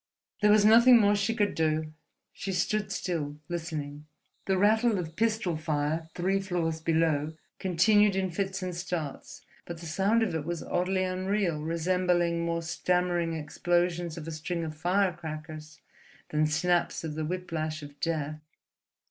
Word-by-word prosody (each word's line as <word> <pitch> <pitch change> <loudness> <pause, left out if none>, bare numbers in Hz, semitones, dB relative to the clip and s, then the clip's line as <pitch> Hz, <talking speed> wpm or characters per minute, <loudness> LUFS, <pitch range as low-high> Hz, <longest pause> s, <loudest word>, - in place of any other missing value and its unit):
There 210 - +5
was 210 0 +6
nothing 235 +3 +8
more 205 -1 +4
she 205 +3 0
could 205 -2 +1
do. 155 -1 0 0.4
She 195 - -4
stood 205 +3 0
still, 150 -5 -3
listening. 155 -3 -5 0.4
The 190 -1 +2
rattle 220 +3 +3
of 165 -3 -5
pistol 215 -5 0
fire 155 +1 -1
three 190 +2 +1
floors 170 -4 -2
below 160 -2 +1 0.3
continued 195 +3 +4
in 190 -1 0
fits 195 +1 -2
and 180 -1 -3
starts, 170 -5 -5 0.2
but 170 -1 -8
the 170 - -9
sound 195 +8 +2
of 220 - -1
it 160 -2 -2
was 170 +1 -4
oddly 185 +1 0
unreal, 185 -3 -1
resembling 170 +1 +1
more 170 0 -1
stammering 175 0 0
explosions 175 +2 -1
of 165 -1 -7
a - - -4
string 165 +2 -3
of 155 -1 -5
firecrackers 160 -3 -2 0.5
than 155 0 +2
snaps 175 +4 +1
of 160 -2 -4
the 155 +1 -3
whiplash 160 -3 -3
of 145 0 -12
Death. 155 -2 -2
170 Hz, 150 wpm, -28 LUFS, 160-190 Hz, 0.5 s, nothing